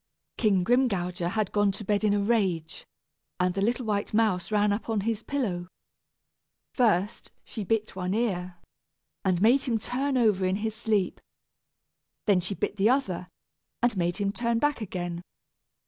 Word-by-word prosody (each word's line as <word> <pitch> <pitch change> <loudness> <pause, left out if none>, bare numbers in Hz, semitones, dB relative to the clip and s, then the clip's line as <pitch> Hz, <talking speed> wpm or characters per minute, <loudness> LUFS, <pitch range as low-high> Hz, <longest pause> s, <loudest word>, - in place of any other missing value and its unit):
King 200 -5 +2
Grimgouger 180 -7 +1
had 210 0 -1
gone 205 -1 +3
to 205 +2 -7
bed 205 +1 +1
in 205 -1 +3
a - - +1
rage, 190 -8 0 0.5
and 180 0 +2
the 195 - -2
little 240 +4 0
white 210 -1 -1
mouse 210 -5 +1
ran 210 -1 +3
up 215 +3 -4
on 220 -2 +1
his 220 +1 -1
pillow. 200 -12 -2 1.1
First 210 -4 +1 0.2
she 215 - -5
bit 220 +1 -1
one 185 +1 -2
ear, 185 -6 -1 0.7
and 185 -3 +2
made 250 +5 +5
him 240 -5 0
turn 265 +5 -1
over 210 -6 +3
in 185 +1 +1
his 220 +2 -2
sleep. 210 -4 -1 1.0
Then 200 -4 +4
she 185 +3 -3
bit 210 - -2
the 205 +3 +4
other, 190 -10 0 0.6
and 240 -2 +3
made 175 -1 0
him 200 -1 0
turn 235 +2 0
back 295 0 +1
again. 175 -4 -4
205 Hz, 165 wpm, -27 LUFS, 185-225 Hz, 1.1 s, made